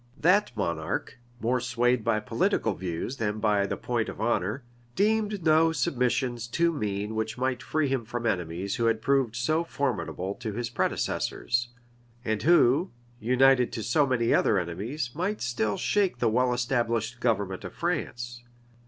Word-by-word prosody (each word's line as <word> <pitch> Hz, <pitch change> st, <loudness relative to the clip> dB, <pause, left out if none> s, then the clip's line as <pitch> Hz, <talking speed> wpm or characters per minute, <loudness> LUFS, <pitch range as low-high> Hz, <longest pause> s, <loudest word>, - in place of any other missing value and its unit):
That 190 Hz, +6 st, +4 dB
monarch, 85 Hz, +3 st, -2 dB, 0.2 s
more 125 Hz, +2 st, +1 dB
swayed 120 Hz, -1 st, +1 dB
by 110 Hz, -1 st, +2 dB
political -, -, 0 dB
views 90 Hz, +8 st, -4 dB
than 105 Hz, -1 st, -1 dB
by 105 Hz, -2 st, +2 dB
the -, -, -3 dB
point 120 Hz, -2 st, -1 dB
of -, -, -8 dB
honor, 110 Hz, +2 st, 0 dB, 0.3 s
deemed 210 Hz, -3 st, +1 dB
no 160 Hz, +1 st, +5 dB
submissions 125 Hz, -3 st, 0 dB
too 170 Hz, +7 st, +1 dB
mean 105 Hz, -5 st, -3 dB
which 110 Hz, +1 st, -2 dB
might 130 Hz, -1 st, -1 dB
free 155 Hz, +3 st, 0 dB
him 135 Hz, -3 st, -1 dB
from 120 Hz, +2 st, -5 dB
enemies 90 Hz, -1 st, -2 dB
who 115 Hz, -, +1 dB
had 115 Hz, -1 st, +1 dB
proved 135 Hz, -5 st, +2 dB
so 155 Hz, +8 st, +1 dB
formidable 125 Hz, -, -2 dB
to 110 Hz, +1 st, -6 dB
his 120 Hz, +2 st, -3 dB
predecessors, 120 Hz, 0 st, -1 dB, 0.6 s
and 110 Hz, -1 st, -1 dB
who, 160 Hz, +1 st, +4 dB, 0.3 s
united 125 Hz, +2 st, +4 dB
to 110 Hz, -, -3 dB
so 140 Hz, +6 st, +2 dB
many 120 Hz, -3 st, +2 dB
other 105 Hz, -, +3 dB
enemies, 105 Hz, -, -3 dB
might 185 Hz, +7 st, -2 dB
still 110 Hz, -4 st, -1 dB
shake 195 Hz, -9 st, +1 dB
the 120 Hz, -1 st, +2 dB
well 125 Hz, +3 st, +2 dB
established 120 Hz, -1 st, -1 dB
government 100 Hz, -6 st, 0 dB
of -, -, -8 dB
France. 120 Hz, -8 st, -3 dB
120 Hz, 155 wpm, -27 LUFS, 110-135 Hz, 0.6 s, no